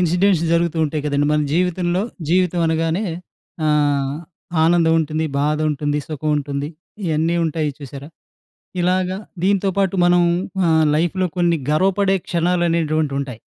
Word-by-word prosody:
Incidents 180 0 +2
జరుగుతూ 170 0 +1
ఉంటాయి 150 0 -2
కదండీ! 145 0 +1
మన 150 0 +2
జీవితంలో. 180 0 0 0.3
జీవితం 180 0 +2
అనగానే 165 +3 0 0.6
ఆహ్, 145 -2 +1 0.5
ఆనందం 165 0 +3
ఉంటుంది, 155 +1 -2
బాధ 150 +2 +1
ఉంటుంది, 145 0 -1
సుఖం 155 0 -3
ఉంటుంది, 140 0 -3 0.4
ఇయన్నీ 160 +1 +1
ఉంటాయి 155 -1 -1
చూసారా? 140 0 -9 0.7
ఇలాగ 180 +1 +1 0.4
దీంతో 195 0 +2
పాటు 195 -1 +1
మనం 175 0 +4 0.5
ఆహ్, 160 -1 +4
లైఫ్‌లో 175 +4 0
కొన్ని 170 -2 +2
గర్వపడే 195 +4 +2
క్షణాలు 175 +1 +1
అనేటువంటివి 155 -4 0
ఉంటాయి. 125 -5 -6
160 Hz, 130 wpm, -20 LUFS, 150-180 Hz, 0.7 s, మనం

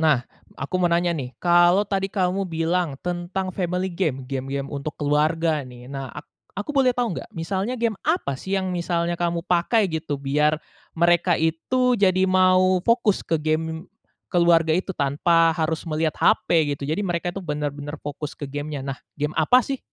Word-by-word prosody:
Nah, 150 -6 +2 0.3
aku 140 +6 -6
mau 175 -1 +2
nanya 170 0 +2
nih, 130 -5 -5
kalau 175 +3 +4
tadi 195 -1 -1
kamu 190 0 0
bilang 165 -2 -1
tentang 180 +2 -3
family 180 0 -2
game, 150 -8 -2
game-game 135 +1 -3
untuk 145 +1 -5
keluarga 155 +1 +1
nih, 125 -1 -12
nah, 135 -1 -6
ak 150 - -10 0.3
aku 205 +7 -4
boleh 270 -4 +3
tahu 240 -7 -1
nggak - - -8
misalnya 190 +8 -2
game 230 -4 -1
apa 310 - 0
sih 190 +6 -3
yang 190 -1 -1
misalnya 170 -1 -1
kamu 170 -1 -1
pakai 185 +5 +2
gitu, 160 -3 -3
biar 150 +2 +1 0.4
mereka 175 +1 +4
itu 245 +11 +1
jadi 190 -1 +3
mau 185 0 +4
fokus 230 -4 +2
ke 165 - 0
game 160 +2 -2 0.4
keluarga 170 -2 +4
itu 185 +3 -1
tanpa 165 +4 +3
harus 160 0 -2
melihat 155 0 0
HP, 155 -4 +3
gitu. 140 - -12
Jadi 175 +7 0
mereka 175 0 -1
itu 175 - -7
benar-benar 145 -3 -4
fokus 145 0 -5
ke 145 -2 -7
game-nya. 145 0 -4
Nah, 135 0 -5 0.2
game 150 +1 -2
apa 250 +11 +5
sih? 270 +2 -3
170 Hz, 170 wpm, -23 LUFS, 150-185 Hz, 0.4 s, apa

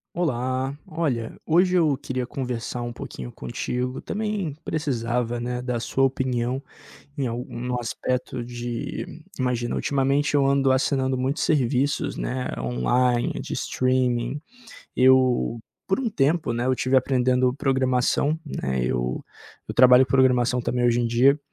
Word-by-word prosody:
Olá. 130 -3 -1
Olha, 140 -9 -2
hoje 180 +3 +3
eu 155 -5 +3
queria 130 -1 -4
conversar 125 -2 -4
um 120 0 -4
pouquinho 65 - -8
contigo, 125 - -4
também 210 -7 -2
precisava, 120 -5 -1
né, 125 +1 -3
da 125 -1 -2
sua 135 +3 0
opinião 130 -1 0 0.6
em 135 - 0
algum 125 +1 -4
aspecto 125 +1 -3
de 120 -1 -4 0.3
imagina, 125 -2 -1
ultimamente 140 +1 +1
eu 140 -1 +3
ando 135 -1 +3
assinando 130 0 +1
muitos 135 +5 -1
serviços, 140 -1 +1
né, 130 0 -3
online, 120 - +1
de - - -7
streaming. 130 +1 0 0.6
Eu 130 -2 +4 0.3
por 190 - +1
um 265 - -1
tempo, 150 - +1
né, 120 +1 -1
eu 130 - +2
tive 130 +1 +1
aprendendo 130 -1 +3
programação, 135 +2 +1
né, 65 - -2
eu 60 0 -2 0.4
eu - - -4
trabalho 125 +1 +7
com 125 - -8
programação 125 -2 +3
também 125 +1 0
hoje 120 0 +3
em 120 - +1
dia, 130 +5 +4
125 Hz, 135 wpm, -24 LUFS, 120-135 Hz, 0.6 s, trabalho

